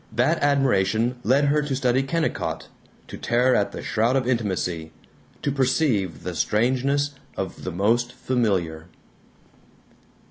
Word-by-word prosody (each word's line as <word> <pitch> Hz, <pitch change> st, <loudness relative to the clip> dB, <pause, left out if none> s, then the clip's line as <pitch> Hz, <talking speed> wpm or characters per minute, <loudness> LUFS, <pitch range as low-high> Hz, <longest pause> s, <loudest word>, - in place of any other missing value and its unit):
That 125 Hz, +9 st, +1 dB
admiration 125 Hz, -4 st, +2 dB
led 135 Hz, +5 st, +3 dB
her 150 Hz, +1 st, +2 dB
to 145 Hz, -2 st, -2 dB
study 130 Hz, 0 st, +2 dB
Kennicott, 155 Hz, +4 st, -2 dB, 0.4 s
to -, -, -8 dB
tear 125 Hz, +2 st, +2 dB
at 100 Hz, -, +1 dB
the -, -, -7 dB
shroud 115 Hz, +4 st, +1 dB
of 130 Hz, -2 st, +1 dB
intimacy, 95 Hz, -9 st, -1 dB, 0.5 s
to 140 Hz, -, +1 dB
perceive 130 Hz, -, 0 dB
the 90 Hz, -, -4 dB
strangeness 130 Hz, -, +1 dB, 0.3 s
of 95 Hz, -, -5 dB
the 90 Hz, -, -2 dB
most 115 Hz, +7 st, +1 dB
familiar. 95 Hz, -11 st, -1 dB
120 Hz, 130 wpm, -24 LUFS, 100-135 Hz, 0.5 s, led